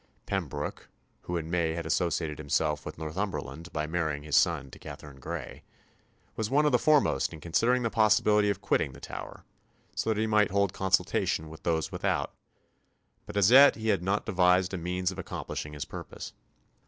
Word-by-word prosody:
Pembroke, 75 Hz, -7 st, -4 dB, 0.3 s
who 90 Hz, -, -3 dB
in 80 Hz, 0 st, -5 dB
May 85 Hz, -2 st, +1 dB
had 85 Hz, -1 st, -4 dB
associated 80 Hz, -2 st, -1 dB
himself 75 Hz, +1 st, 0 dB
with -, -, -7 dB
Northumberland 80 Hz, -1 st, -4 dB
by 75 Hz, 0 st, -2 dB
marrying 80 Hz, -3 st, -2 dB
his 75 Hz, -2 st, -1 dB
son 70 Hz, -, +2 dB
to -, -, -12 dB
Katherine 70 Hz, -2 st, -10 dB
Grey, -, -, -6 dB, 0.7 s
was 110 Hz, -1 st, -2 dB
one 150 Hz, +3 st, +3 dB
of 150 Hz, -, +3 dB
the -, -, +4 dB
foremost 155 Hz, -2 st, +3 dB
in 80 Hz, -, -8 dB
considering 115 Hz, +11 st, +1 dB
the 115 Hz, -, 0 dB
possibility 105 Hz, -1 st, +4 dB
of 100 Hz, -1 st, -2 dB
quitting 65 Hz, -, +1 dB
the -, -, -12 dB
Tower, -, -, -8 dB, 0.5 s
so -, -, -1 dB
that 110 Hz, -1 st, +1 dB
he 110 Hz, -, +2 dB
might 105 Hz, -2 st, +3 dB
hold 100 Hz, -1 st, +1 dB
consultation 95 Hz, -4 st, 0 dB
with 80 Hz, -, -11 dB
those 80 Hz, -2 st, -1 dB
without; -, -, -1 dB, 0.9 s
but 105 Hz, -, -5 dB
as 100 Hz, +2 st, +5 dB
yet 140 Hz, +2 st, +9 dB
he 110 Hz, 0 st, -3 dB
had 95 Hz, -, +2 dB
not 95 Hz, +3 st, 0 dB
devised 90 Hz, +1 st, +3 dB
a -, -, -1 dB
means 90 Hz, +2 st, -1 dB
of 95 Hz, -, -8 dB
accomplishing 75 Hz, -4 st, -5 dB
his 75 Hz, -, -5 dB
purpose. -, -, -8 dB
90 Hz, 180 wpm, -29 LUFS, 80-105 Hz, 0.9 s, yet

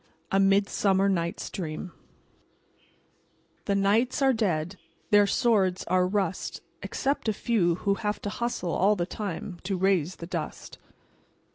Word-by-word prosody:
A 195 Hz, -, +3 dB
MIDSUMMER 195 Hz, 0 st, +3 dB
KNIGHT'S 170 Hz, -3 st, -2 dB
DREAM 170 Hz, 0 st, -5 dB, 1.8 s
"_The 200 Hz, -1 st, +2 dB
knights 215 Hz, +6 st, +2 dB
are 265 Hz, -1 st, +5 dB
dead; 180 Hz, -5 st, -1 dB, 0.3 s
Their 205 Hz, -1 st, +6 dB
swords 200 Hz, -7 st, +2 dB
are 180 Hz, 0 st, +2 dB
rust. 190 Hz, -2 st, -2 dB, 0.2 s
Except 275 Hz, -4 st, -1 dB
a -, -, +1 dB
few 195 Hz, -6 st, +1 dB
who 200 Hz, +3 st, 0 dB
have 210 Hz, -1 st, -1 dB
to 205 Hz, -, -3 dB
hust 235 Hz, -4 st, -3 dB
Le 175 Hz, -, -1 dB
all 200 Hz, +5 st, +3 dB
the 175 Hz, -3 st, -1 dB
time 185 Hz, -2 st, -5 dB
To 195 Hz, 0 st, -1 dB
raise 185 Hz, -2 st, +1 dB
the 170 Hz, -, -8 dB
dust. 170 Hz, -3 st, -6 dB
195 Hz, 140 wpm, -27 LUFS, 180-210 Hz, 1.8 s, Their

